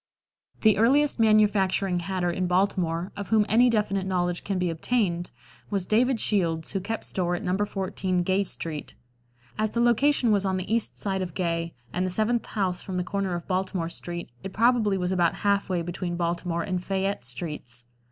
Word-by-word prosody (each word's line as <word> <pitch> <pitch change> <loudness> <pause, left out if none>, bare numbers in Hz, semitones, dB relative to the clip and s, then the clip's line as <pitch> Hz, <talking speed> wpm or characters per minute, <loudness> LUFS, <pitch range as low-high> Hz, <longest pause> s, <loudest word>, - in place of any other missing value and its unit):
The 215 -3 +5
earliest 275 +5 +3
manufacturing 200 -4 +3
hatter 175 0 -1
in 185 +1 -1
Baltimore, 180 -2 0
of 200 -1 -6
whom 215 -2 +4
any 240 +4 +5
definite 200 -4 0
knowledge 175 -2 -1
can 195 -2 -2
be 180 -1 0
obtained, 175 -1 0 0.4
was 195 -3 -1
David 235 +4 +2
Shields, 165 -7 0
who 195 - -1
kept 225 +4 -4
store 175 -2 -1
at 210 - -5
No. 180 -1 0
14 190 -2 -1
Gay 190 +2 +2
street. 160 -5 -5 0.6
As 215 0 +2
the 235 - -2
location 240 +1 +3
was 200 -2 +3
on 190 -1 0
the 185 +4 -3
east 230 -1 -1
side 190 -2 -2
of 175 -3 -5
Gay 165 -2 -1 0.2
and 180 - 0
the 185 - 0
seventh 220 +5 0
house 185 -4 -1
from 185 -2 -5
the 180 - 0
corner 195 -1 -2
of 170 - -6
Baltimore 185 -2 -1
street, 175 -3 -6
it 195 -1 -6
probably 225 -3 +3
was 180 0 -1
about 175 -3 +2
half 200 -1 +2
way 175 -2 0
between 175 0 -4
Baltimore 170 0 -1
and 185 -2 -2
Fayette 195 -4 -1
streets. 125 -2 -5
190 Hz, 185 wpm, -26 LUFS, 175-210 Hz, 0.6 s, The